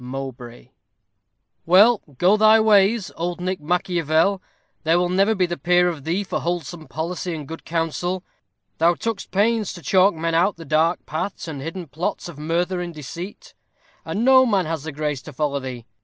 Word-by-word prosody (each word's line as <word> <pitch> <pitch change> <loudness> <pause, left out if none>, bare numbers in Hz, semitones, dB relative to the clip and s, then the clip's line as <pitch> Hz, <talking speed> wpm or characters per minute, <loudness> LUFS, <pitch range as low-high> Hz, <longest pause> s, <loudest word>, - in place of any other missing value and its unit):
MOWBRAY_ 125 - -8 0.9
Well, 205 +6 +5 0.2
go 185 +7 +4
thy 215 +1 +6
ways, 210 0 +3
old 175 +1 -3
Nick 185 0 -3
Machiavel, 175 +2 +1 0.4
there 165 +2 +2
will 175 0 +1
never 195 +4 +2
be 185 -2 +2
the 175 -2 -5
peer 180 +3 +3
of 155 -6 -7
thee 175 +5 0
for - - -3
wholesome 175 -1 -4
policy 175 +2 -4
and 150 -3 -7
good 165 +2 -9
counsel: 170 +2 -2 0.6
thou 170 +2 +4
took'st 225 +2 -4
pains 215 +2 +1
to 175 - -11
chalk 190 +6 +4
men 165 +1 -2
out 180 +4 +2
the 165 - -10
dark 160 +4 +1
paths 170 +4 -4
and 145 -4 -6
hidden 165 +4 -5
plots 160 +6 -4
of 165 -4 -10
murther 175 +4 -1
and 170 -2 -6
deceit, 175 - -8 0.5
and 220 +4 -2
no 260 0 +7
man 200 -8 +1
has 160 -1 -3
the 160 - -4
grace 150 -2 -3
to - - -11
follow 140 0 -1
thee. 125 -3 -7
175 Hz, 180 wpm, -22 LUFS, 155-190 Hz, 0.9 s, no